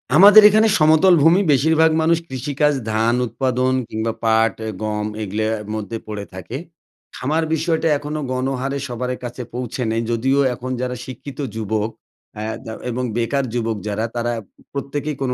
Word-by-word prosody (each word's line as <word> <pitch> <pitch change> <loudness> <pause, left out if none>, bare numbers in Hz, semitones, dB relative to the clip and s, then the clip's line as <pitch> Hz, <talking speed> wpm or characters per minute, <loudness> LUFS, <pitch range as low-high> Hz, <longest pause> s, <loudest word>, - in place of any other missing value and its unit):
আমাদের 205 +3 +10
এখানে 215 +2 +4
সমতল 160 +4 +5
ভূমি 170 +5 +5
বেশিরভাগ 160 +3 +4
মানুষ 165 +1 +3
কৃষিকাজ 140 +3 0 0.2
ধান 110 +2 +2
উৎপাদন 130 +2 0 0.2
কিংবা 110 +1 -2
পাট 110 0 +3
অ্যা 110 - -3
গম 105 -1 -2 0.2
এগুলোর 105 +2 -2 0.3
মধ্যে 110 +1 -4
পড়ে 105 -1 -5
থাকে। 95 +7 -6 0.6
খামার 155 +5 0
বিষয়টা 160 0 0
এখনও 150 +1 -4
গণহারে 135 +1 -2
সবারে 125 +1 -3
কাছে 120 +1 -6
পৌঁছে 125 +1 -4
নেই, 115 +1 0
যদিও 130 +4 +1
এখন 130 +1 -6
যারা 125 0 -2
শিক্ষিত 130 +2 -9 0.2
যুবক, 110 0 -1 0.5
আ - - -4 0.2
দা 110 - -6 0.2
এবং 125 +2 -2
বেকার 130 +4 0
যুবক 115 -2 -1
যারা 105 +2 -1
তারা 120 0 -1 0.3
উ - - -20
প্রত্যেকেই 145 +2 -3
কোনো 130 -2 0
125 Hz, 155 wpm, -20 LUFS, 115-150 Hz, 0.6 s, আমাদের